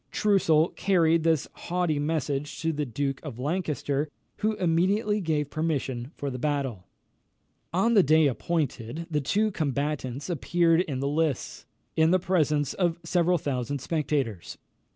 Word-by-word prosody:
Troussel 175 -6 +3
carried 165 -4 +3
this 160 -3 +2
haughty 175 -4 -1
message 145 -1 -2
to 165 0 0
the 150 -1 -2
Duke 135 +3 -2
of 140 -7 -7
Lancaster, 150 -1 -1 0.3
who 215 0 0
immediately 200 +5 +1
gave 150 -4 -1
permission 140 -5 -2
for 140 -1 -3
the 125 - -5
battle. 135 -9 -2 0.8
On 195 +7 +2
the 205 - +7
day 155 -1 +4
appointed, 140 0 -2
the 150 -1 +1
two 210 +10 +1
combatants 140 -4 -2
appeared 170 0 +2
in 140 -7 -3
the 140 - 0
lists, 150 -2 -1 0.3
in 160 0 +4
the 185 - +5
presence 155 -6 +1
of 175 -3 0
several 175 +1 +2
thousand 140 -2 -2
spectators. 140 - -2
155 Hz, 140 wpm, -27 LUFS, 140-175 Hz, 0.8 s, the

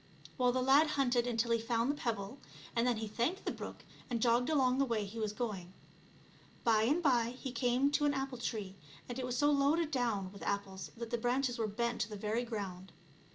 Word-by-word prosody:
Well, 250 -2 +3
the 255 +1 0
lad 280 +4 +6
hunted 245 -3 +2
until 235 0 0
he 230 - +3
found 230 +3 +1
the - - -3
pebble, 230 -1 -3 0.4
and 235 +1 +2
then 245 -2 +2
he 220 0 -3
thanked 245 - -1
the - - 0
brook - - -8 0.2
and 240 -2 -1
jogged 240 +3 +3
along 265 -4 +3
the - - +5
way 225 -4 -1
he 215 +3 -7
was 215 -2 -1
going. 205 -6 -4 0.9
By 225 -3 +4
and 305 +8 +2
by 245 -4 +3
he 265 - -4
came 255 +2 +2
to 295 0 +2
an 290 -1 +2
apple 270 -2 -3
tree, 210 -5 -3 0.3
and 245 +1 -5
it 255 - -2
was 250 0 -2
so 290 +3 +4
loaded 295 +3 +2
down 225 -8 0
witt 200 - -12
apples 195 -1 -3
that 235 0 -6
the 240 - 0
branches 245 +1 0
were 220 - +1
bent 235 +3 -1
to 225 - -1
the 210 - -6
very 215 +4 -1
ground. 195 -5 -5
240 Hz, 220 wpm, -34 LUFS, 220-260 Hz, 0.9 s, lad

